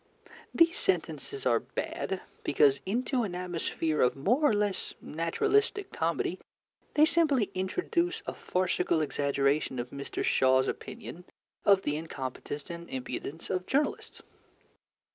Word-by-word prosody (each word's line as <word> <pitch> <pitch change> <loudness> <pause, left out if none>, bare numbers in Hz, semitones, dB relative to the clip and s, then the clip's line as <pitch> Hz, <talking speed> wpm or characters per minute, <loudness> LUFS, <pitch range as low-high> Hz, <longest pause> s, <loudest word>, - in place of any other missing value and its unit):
These 335 +3 +4
sentences 415 -1 -1
are - - +4
bad 190 -1 -4 0.2
because 140 -1 +4
into 250 +5 0
an 195 -6 -3
atmosphere 165 -3 -1
of 125 - +3
more 210 - +2
or - - +2
less 205 -2 -1
naturalistic 395 - 0
comedy 165 +2 -1 0.6
they 300 - +7
simply 290 - +3
introduce 340 - -1
a - - -3
farcical 180 -2 0
exaggeration 140 -1 +1
of 120 0 -4
Mr. 140 0 -4
Shaw's 130 0 +4
opinion 190 -5 -6 0.4
of 195 -1 +5
the 145 0 0
incompetence 145 0 -5
and 170 0 -8
impudence 135 +4 -5
of 180 0 -2
journalists. 285 +3 -1
180 Hz, 125 wpm, -30 LUFS, 145-240 Hz, 0.6 s, they